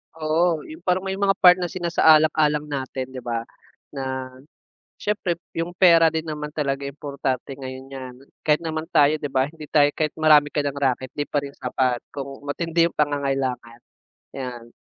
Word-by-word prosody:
Oo, 160 0 +1
yung 160 +2 -11
parang 185 0 +1
may 190 0 -3
mga 195 -1 +3
part 180 0 +8
na 175 - -1
sinasaalang-alang 155 -4 +3
natin 130 -2 -4
'di 130 -1 -7
ba. 115 -1 -2 0.5
Na, 130 -2 -4 0.6
siyempre 205 -4 -1 0.2
yung 170 +2 -4
pera 170 -3 +6
din 160 0 -1
naman 150 -2 -5
talaga 140 -2 -2
importante 140 -2 -4
ngayon 130 0 -8
‘yan. 130 -2 -8 0.3
Kahit 150 0 +3
naman 160 0 -3
tayo 150 -2 +4
'di 150 - -3
ba, 135 +1 +1
hindi 160 -2 -10
tayo 145 -1 +4
kahit 155 -1 -2
marami 155 -2 +5
ka 145 - 0
nang 140 0 -3
raket, 130 -1 0
'di 145 0 -3
pa - - -2
rin 140 0 -7
sapat 125 -2 0
kung 135 -1 -6
matindi 165 +3 +1
yung - - -12
pangangailangan. 135 -5 -1 0.6
‘Yan. 120 -3 -6
145 Hz, 170 wpm, -23 LUFS, 135-160 Hz, 0.6 s, part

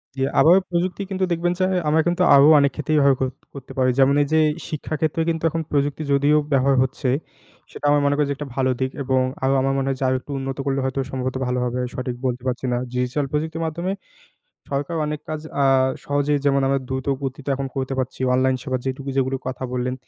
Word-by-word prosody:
জি, 135 - -4 0.2
আবারও 175 +4 +7
প্রযুক্তি 180 +3 -1
কিন্তু 190 -1 -2
দেখবেন 175 +1 +1
যে, 185 - +3 0.2
আমরা 160 +1 +4
কিন্তু 175 +1 0
আরও 140 +1 +7
অনেক 140 -1 +3
ক্ষেত্রেই 155 +1 -1
ব্যবহার 140 -2 +5
কর 130 - +1 0.2
করতে 135 -1 -10
পারি। 130 -1 +3
যেমন 135 +1 +5
এই 145 - +1
যে, 160 - +5 0.3
শিক্ষা 155 0 -4
ক্ষেত্রে 160 +1 0
কিন্তু 165 -1 -2
এখন 165 +1 -2
প্রযুক্তি, 145 +1 0
যদিও 145 +2 +4
ব্যবহার 135 0 +3
হচ্ছে, 130 0 -2 0.6
সেটা - - -7
আমি 145 - +4
মনে 145 0 +2
করি 150 - +2
যে, - - +1
একটা 150 - -6
ভালো 130 -1 +1
দিক। 130 0 -1
এবং 130 0 +2 0.2
আরও 135 +1 +3
আমার 135 +1 +1
মনে 135 0 -1
হয় 135 - -1
যে, - - -2
আরো 130 - +2
একটু 145 - -11
উন্নত 135 0 -4
করলে 135 0 0
হয়তো 130 +1 -2
সম্ভবত 130 0 -3
ভালো 125 0 0
হবে। 125 +1 -2
সঠিক 125 -1 -4
বলতে 125 -1 -1
পারছি 130 +1 -2
না। - - +1
ডিজিটাল 125 +3 -1
প্রযুক্তির 160 +2 -2
মাধ্যমে 170 +4 -2 0.8
সরকার 140 +4 -2
অনেক 150 0 -3
কাজ 155 -1 -3 0.2
আ - - +4 0.4
সহজেই, 145 +1 +1
যেমন 140 -1 +3
আমরা 135 0 +1
দ্রুত 130 0 -3 0.2
গতিতে 135 +1 -5
এখন 135 0 -3
করতে 135 0 -3
পারছি। 130 0 -3
অনলাইন 130 0 +2
সেবা, 130 -3 -2
যেটুকু 135 +1 -4
সেগুলি 135 0 +1
কথা 130 0 -5
বললেন, 125 0 -1
140 Hz, 220 wpm, -22 LUFS, 130-150 Hz, 0.8 s, আবারও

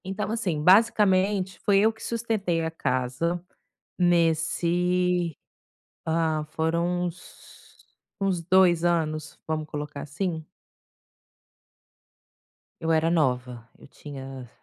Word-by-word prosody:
Então 195 +3 -3
assim, 185 -10 -1
basicamente 195 -1 +3
foi 200 -1 +4
eu 220 +2 +3
que 220 - -14
sustentei 220 -7 -1
a 160 - -2
casa, 135 +4 -1 0.6
nesse 175 0 +1 0.7
ah, 160 -1 0
foram 170 +3 0
uns 175 +1 -12 0.6
uns 190 -3 0
2 175 -1 +4
anos 155 -3 -1
vamos 155 -1 -2
colocar 145 -1 -6
assim. 160 +2 -3 2.4
Eu 165 - 0
era 160 +1 +2
nova, 125 -7 -1
eu - - -16
tinha 135 -3 -9
170 Hz, 100 wpm, -26 LUFS, 155-185 Hz, 2.4 s, foi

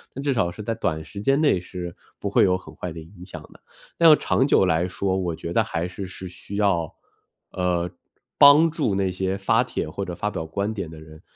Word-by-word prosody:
但 135 - -5
至 140 - +1
少 95 -8 0
是 105 - -9
在 115 - -2
短 80 -8 -2
时 100 - -8
间 135 +6 +2
内 145 - +3
是 90 -1 -7 0.2
不 100 - -4
会 - - +4
有 90 -1 +3
很 80 -4 -14
坏 90 +2 -5
的 80 - -8
影 85 +3 -13
响 - - -8
的。 - - -20 0.4
但 160 -3 +8
长 130 - +1
久 95 - +4
来 90 0 +1
说， 95 +1 -2
我 85 -3 -2
觉 85 +2 -6
得 115 - +3
还 85 -5 -3
是 95 +1 -7
是 95 0 -9
需 90 +3 -10
要， 95 -6 0 0.6
呃， 90 -1 -1 0.5
帮 150 +3 +8
助 145 -11 -1
那 95 -1 0
些 95 +1 -2
发 - - +2
帖 - - -4
或 100 +6 -5
者 90 - -6
发 105 +3 -2
表 80 - -5
观 100 +6 -2
点 100 -6 -5
的 80 -1 -11
人， 80 0 -14
95 Hz, 250 characters per minute, -24 LUFS, 85-105 Hz, 0.6 s, 但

